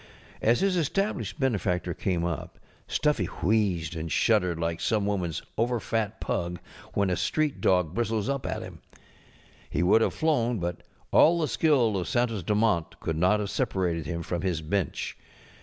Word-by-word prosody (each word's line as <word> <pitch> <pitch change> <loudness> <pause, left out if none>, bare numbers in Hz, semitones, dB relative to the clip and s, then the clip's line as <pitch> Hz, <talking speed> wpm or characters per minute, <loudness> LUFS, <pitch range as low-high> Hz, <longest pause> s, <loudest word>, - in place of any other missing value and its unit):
As 115 +2 +3
his 195 -2 +2
established 195 +2 -1
benefactor 95 - 0
came 85 0 -1
up 85 -5 -4 0.3
Stuffy 150 - +1
wheezed 90 -6 0
and 80 0 -4
shuddered 90 -7 +2
like 85 0 -2
some 105 -3 +1
womanŌĆÖs 90 -6 -1 0.2
over 120 +1 +1
fat 110 -1 -2
pug 85 0 -2 0.4
when 100 -2 +2
a - - +2
street 150 - 0
dog 90 -4 +2
bristles 110 -2 -1
up 140 -2 -2
at - - -3
him. - - -10 0.9
He 80 - 0
would 100 +5 +5
have - - +1
flown, 125 -7 +1
but 85 -2 -3 0.3
all 170 +2 +6
the 155 - +1
skill 130 -12 +2
of 90 - -2
Santos 120 -4 0
Dumont 105 -3 +1
could 80 - -2
not 90 +6 +3
have 105 -1 -3
separated 90 - -1
him 85 0 -3
from 85 0 -3
his 90 -4 -1
bench. 90 +3 -2
100 Hz, 165 wpm, -27 LUFS, 85-120 Hz, 0.9 s, all